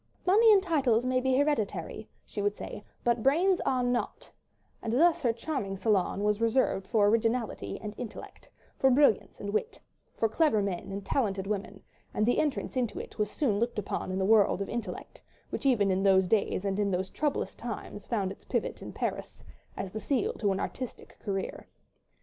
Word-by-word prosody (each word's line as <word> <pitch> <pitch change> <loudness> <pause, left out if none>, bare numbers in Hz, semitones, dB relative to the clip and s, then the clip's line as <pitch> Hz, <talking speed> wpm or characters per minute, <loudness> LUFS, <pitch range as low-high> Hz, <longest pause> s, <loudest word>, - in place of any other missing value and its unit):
"Money 435 +5 +6
and 395 -2 +6
titles 265 - +2
may 255 0 +1
be 260 0 +2
hereditary," 220 - -1 0.2
she 205 - -5
would 205 0 0
say, 205 - -7 0.2
"but 235 -1 +2
brains 350 - +3
are 255 -1 +2
not," 245 0 -2 0.5
and 225 - -3
thus 335 +6 +4
her 245 -5 +3
charming 230 -5 -3
salon 200 -1 +1
was 210 +1 +1
reserved 230 -4 +1
for 215 -4 +3
originality 225 - 0
and 210 -1 -6
intellect, 240 -4 -8 0.3
for 265 - +5
brilliance 250 -7 +3
and 200 - -4
wit, 445 - -2 0.4
for 225 - +2
clever 225 0 +2
men 195 -1 -3
and 195 0 -5
talented 195 -7 0
women, 200 -1 -4 0.3
and 215 - +2
the 245 - +2
entrance 295 -3 -1
into 245 -4 -1
it - - -9
was 210 -1 +1
soon 215 -5 0
looked 235 0 -1
upon 195 -2 -3
in 185 - -2
the 190 - +1
world 210 -2 +4
of 200 - -3
intellect—which 240 +3 -6
even 210 -7 +3
in 190 +1 +1
those 190 -1 +4
days 200 -1 +1
and 195 0 -1
in 205 -1 +2
those 185 0 -2
troublous 295 -1 -1
times 210 -3 -7
found 200 -5 -1
its - - -11
pivot - - -2
in - - -7
Paris—as 190 - -6
the 215 - -5
seal 270 +1 0
to 205 -3 0
an 190 - -1
artistic 255 +3 -6
career. 195 -2 -4
220 Hz, 185 wpm, -29 LUFS, 200-255 Hz, 0.5 s, Money